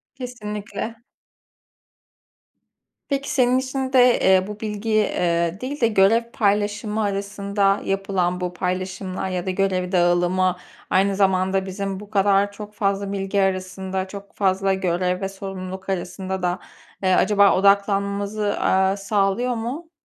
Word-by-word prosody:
Kesinlikle. 215 -3 -6 2.1
Peki 280 -1 -1
senin 255 -3 +3
için 265 0 -3
de, 250 -1 +5
eee, 190 0 +4
bu 210 0 -7
bilgiyi, 215 0 0
eee, 170 -2 0
değil 275 +3 -5
de 230 - +5
görev 215 +2 +4
paylaşımı 210 +1 0
arasında 200 0 0
yapılan 190 -2 -1
bu 180 0 -2
paylaşımlar 185 +1 -3
ya 180 -1 -3
da - - -2
görev 185 -1 0
dağılımı 180 0 +2 0.3
aynı 195 +1 +2
zamanda 190 -1 +2
bizim 195 0 -4
bu 205 0 -11
kadar 200 -1 +3
çok 210 +1 -10
fazla 200 -1 -1
bilgi 195 0 -1
arasında, 190 0 -2
çok 200 +1 -10
fazla 195 0 +1
görev 180 0 -1
ve 195 - -2
sorumluluk 190 -1 -7
arasında 190 +1 -3
da, 180 0 -1 0.4
eee, 185 -1 +3
acaba 200 0 +4
odaklanmamızı, 200 +1 +1
aaa, 190 +1 +2
sağlıyor 200 +4 0
mu? 265 +9 -5
195 Hz, 130 wpm, -22 LUFS, 185-210 Hz, 2.1 s, de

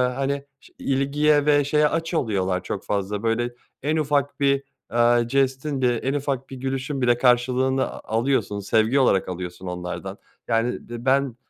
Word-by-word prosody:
hani, 140 +1 -2
ş - - -20
ilgiye 145 +2 +2
ve 145 -1 +4
şeye 150 +2 +3
aç 165 +2 -2
oluyorlar 95 - 0
çok 100 - -4
fazla. 100 +1 -2
Böyle, 120 +2 0 0.3
en 155 +3 +1
ufak 145 -2 0
bir, 140 -1 +2 0.3
eee, 120 0 +4
jestin, 135 +1 0
bir 120 -2 +1
en 135 - 0
ufak 135 -2 -2
bir 135 - -7
gülüşün 135 +1 -3
bile 120 -1 +3
karşılığını 130 +2 +2
a - - -9 0.2
alıyorsun 120 -4 0
sevgi 110 +6 +2
olarak 100 -9 +3
alıyorsun 90 0 -6
onlardan. 90 0 -5 0.3
Yani 115 +2 +1 0.2
be 120 0 -7
ben, 135 -2 +2
130 Hz, 160 wpm, -23 LUFS, 115-140 Hz, 0.3 s, ve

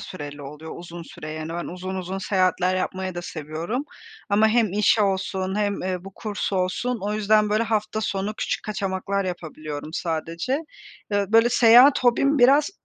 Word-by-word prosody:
süreli 145 -4 -8
oluyor. 150 +3 -9
Uzun 170 0 -9
süre, 155 -1 -9
yani, 155 0 -5
ben 170 +1 -4
uzun 185 +2 -6
uzun 190 +1 -4
seyahatler 185 -1 +1
yapmayı 185 0 -3
da 175 - -5
seviyorum 165 - -4 0.4
ama 215 +2 +4
hem 220 -4 +2
iş 210 +2 +3
olsun 190 -1 0
hem, 205 -1 -1
eee, 185 -1 -3
bu 195 -1 -10
kurs 205 -2 -4
olsun; 195 +6 -1
o 210 +1 -1
yüzden, 215 0 +3
böyle, 215 +2 +2
hafta 220 -1 -1
sonu 205 0 -2
küçük - - -2
kaçamaklar 195 -1 -2
yapabiliyorum 155 -4 -6
sadece. 170 - -2 0.5
Iıı, 205 0 +1
böyle, 230 +1 +6
seyahat 245 +4 +6
hobim 275 +4 +3
biraz 280 +7 +5
195 Hz, 165 wpm, -24 LUFS, 175-215 Hz, 0.5 s, böyle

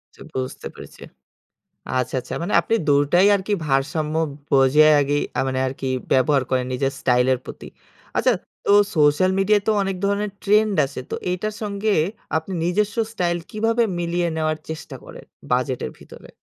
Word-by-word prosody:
চ্ছা - - -18
বুঝতে 130 0 -4
পেরেছি। - - -13 1.0
আচ্ছা, 125 +1 -2
আচ্ছা। - - -7
মানে 175 - -3
আপনি 225 - -1
২ 145 - +5 0.2
টাই 180 +3 +6
আরকি 200 +1 0
ভারসাম্য 150 +3 0 0.4
বজায় 145 +3 +5
আগেই 145 +1 0 0.3
মানে 130 0 -2
আরকি 130 0 -4 0.2
ব্যবহার 135 +1 +3
করেন 130 -1 +1
নিজের 135 +1 -1
স্টাইলের 125 0 +2
প্রতি। - - -9 0.5
আচ্ছা, - - +3 0.3
তো - - +3 0.2
সোশ্যাল 150 +4 +4
মিডিয়ায় 205 +1 +3
তো - - +5
অনেক 195 -1 -2
ধরনের 200 +1 -1
trend 210 +1 +3
আছে। 135 -1 -7
তো - - -2 0.2
এইটার 210 +4 -2
সঙ্গে 205 0 -1 0.4
আপনি 160 +4 -3
নিজস্ব 205 +5 0 0.2
স্টাইল 175 -4 0
কীভাবে 225 +2 +1 0.2
মিলিয়ে 175 0 -1
নেওয়ার 155 -1 -1
চেষ্টা 160 0 -7
করেন? - - -11 0.3
বাজেটের 125 - -1
ভিতরে। - - -14
160 Hz, 155 wpm, -22 LUFS, 135-200 Hz, 1.0 s, টাই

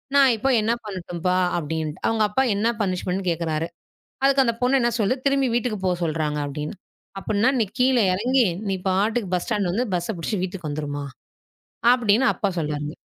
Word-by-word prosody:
நான் 275 -2 +6
இப்போது 255 +1 +2
என்ன 225 +2 +2
பண்ணட்டும், 180 -4 -6
அப்பா?" 180 0 +2 0.2
அப்படி 160 -1 -3
என்றிட்டு. 155 -1 -6
அவங்க 220 -1 +2
அப்பா 265 +6 +1
என்ன 210 +3 +1 0.2
பனிஷ்மென்ட்னு 185 -1 -1
என்று 185 -2 -2
கேட்கிறார். 165 -1 -2 0.6
அதற்கு 275 0 +5
அந்தப் 235 -2 -1
பொண்ணு 260 +2 +4
என்ன 240 - +2
சொல்கிறது? 255 +5 0
"திரும்பி 275 -1 +2
வீட்டுக்குப் 220 -5 -2
போ - - +3
என்று 175 0 -4
சொல்கிறாங்க" 155 -2 -1
அப்படி 145 +1 -5
என்று. 155 - -7 0.4
"அப்படி 205 +1 -2
என்றால், 255 +5 +3
நீ 220 - +2
கீழே 250 -3 +4
இறங்கி 245 +5 +2 0.2
நீ 190 - 0
பாட்டுக்கு 205 +1 0
பஸ் 175 - -4
ஸ்டாண்ட் 205 -5 0
வந்து 240 +7 0
பஸ்ஸை 175 +5 -1
பிடிச்சுக்கிட்டு 180 +3 -2
வீட்டுக்கு 175 -4 -6
வந்துருவியா?" 145 -1 -4 0.9
அப்படி 225 -5 +3
என்று 260 +1 +3
அப்பா 200 -3 0
சொல்கிறாருங்க. 150 -1 -3
200 Hz, 195 wpm, -23 LUFS, 170-240 Hz, 0.9 s, நான்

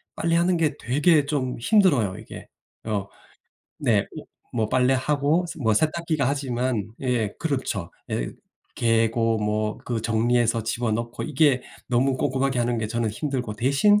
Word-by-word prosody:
빨래하는 170 +2 +2
게 155 -3 +1
되게 150 +4 +3
좀 135 -3 -2
힘들어요, 140 - +3
이게. - - -10 0.4
어 105 -3 -2 0.7
네. 115 -7 +3
어 - - -5 0.5
뭐 110 -1 +1
빨래하고 140 +6 +2
뭐 110 -3 +2
세탁기가 155 0 +1
하지만 125 -6 -1 0.2
예 120 -5 0
그렇죠. 130 - -2 0.2
예 - - -2 0.5
개고 115 0 +2
뭐 105 0 -1
그 120 -2 -2
정리해서 115 +1 +1
집어넣고 115 +1 -2
이게 145 -4 +2 0.3
너무 130 +2 +2
꼼꼼하게 130 -1 0
하는 120 0 0
게 110 - -1
저는 115 0 -1
힘들고 125 -3 -3
대신 140 - +3
125 Hz, 280 characters per minute, -24 LUFS, 115-145 Hz, 0.7 s, 되게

